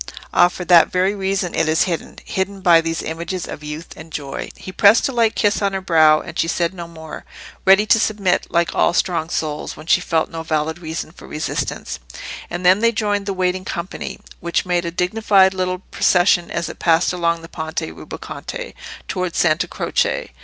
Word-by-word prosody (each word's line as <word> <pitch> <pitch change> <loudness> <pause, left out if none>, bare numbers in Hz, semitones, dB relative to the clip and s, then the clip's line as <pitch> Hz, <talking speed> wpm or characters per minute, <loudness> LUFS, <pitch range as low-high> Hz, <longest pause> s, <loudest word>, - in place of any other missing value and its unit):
"Ah! 175 - +6
for 180 0 -7
that 175 -2 +6
very 185 +2 +2
reason 195 -2 -1
it 155 - +1
is 160 - +3
hidden—hidden 190 +2 -4
by 170 -3 +6
these 165 0 -3
images 170 +2 -4
of 150 - -8
youth 150 +3 -7
and 160 +1 -12
joy." 140 -3 -5
He 185 - -9
pressed 200 +4 +5
a - - -3
light 230 -3 +2
kiss 205 0 +1
on 200 -1 +1
her 195 - -1
brow, 155 -4 +5
and 170 - -8
she - - +2
said 170 +1 0
no 170 -2 -7
more, 160 -2 -9 0.4
ready 195 +2 +6
to 225 - +4
submit, 205 -4 +1
like 170 0 +1
all 170 - +2
strong 170 -4 0
souls, 150 -3 -3
when 155 - -11
she 180 - +3
felt 160 -2 0
no 165 - -5
valid 160 0 -1
reason 160 -1 -5
for - - -14
resistance. 155 +1 -3 0.5
And 175 +1 -5
then 185 +2 +6
they 230 +1 +3
joined 205 -2 -1
the 200 - 0
waiting 185 0 -1
company, 175 -1 -5 0.2
which 170 +1 -1
made 175 -1 0
a - - -1
dignified 190 +2 +3
little 185 -1 -1
procession 175 -1 +3
as 170 0 -2
it - - -9
passed 165 +1 +3
along 170 -2 0
the - - -9
Ponte 160 -1 -4
Rubaconte - - -7 0.3
towards 180 -2 -3
Santa 155 +1 +2
Croce. - - -1
175 Hz, 195 wpm, -20 LUFS, 165-190 Hz, 0.5 s, Ah